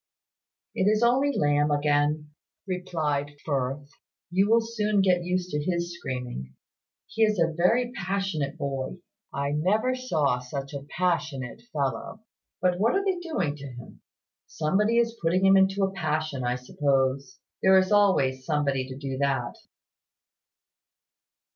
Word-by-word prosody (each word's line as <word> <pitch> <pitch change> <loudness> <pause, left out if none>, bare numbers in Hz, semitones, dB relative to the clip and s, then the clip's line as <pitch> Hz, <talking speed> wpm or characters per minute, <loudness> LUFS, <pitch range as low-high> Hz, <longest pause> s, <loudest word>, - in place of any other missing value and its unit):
"It 190 - 0
is 215 +2 +3
only 260 +4 +3
Lamb 145 0 +2
again," 145 +1 +1 0.4
replied 155 -6 -2
Firth. 140 -1 -2 0.4
"You 195 +3 +2
will 230 +1 +6
soon 215 -3 0
get 180 -2 +3
used 180 0 -2
to 150 - -1
his 170 0 -2
screaming. 125 - -6 0.5
He 225 - -5
is 215 -1 +4
a 165 -1 +2
very 230 +9 +2
passionate 190 - -2
boy 140 +1 -3 0.3
I 140 0 -2
never 200 +12 +1
saw 160 - 0
such 135 +3 -6
a 140 -1 -6
passionate 150 -8 -1
fellow." 145 +8 -3 0.4
"But 180 -1 +2
what 225 +4 +3
are 390 0 +1
they 375 -2 0
doing 195 - -2
to 140 -1 -8
him?" 125 -2 -11 0.5
"Somebody 205 +9 +1
is 230 -1 +2
putting 175 +3 +2
him 195 0 +7
into 195 +1 +3
a 195 - +1
passion, 155 -6 -2
I 125 0 0
suppose. 135 0 0 0.2
There 190 0 +6
is 185 +1 +2
always 145 -11 +3
somebody 140 -3 0
to 130 - -7
do 135 -1 -5
that." 135 -4 0
160 Hz, 140 wpm, -26 LUFS, 140-195 Hz, 0.5 s, him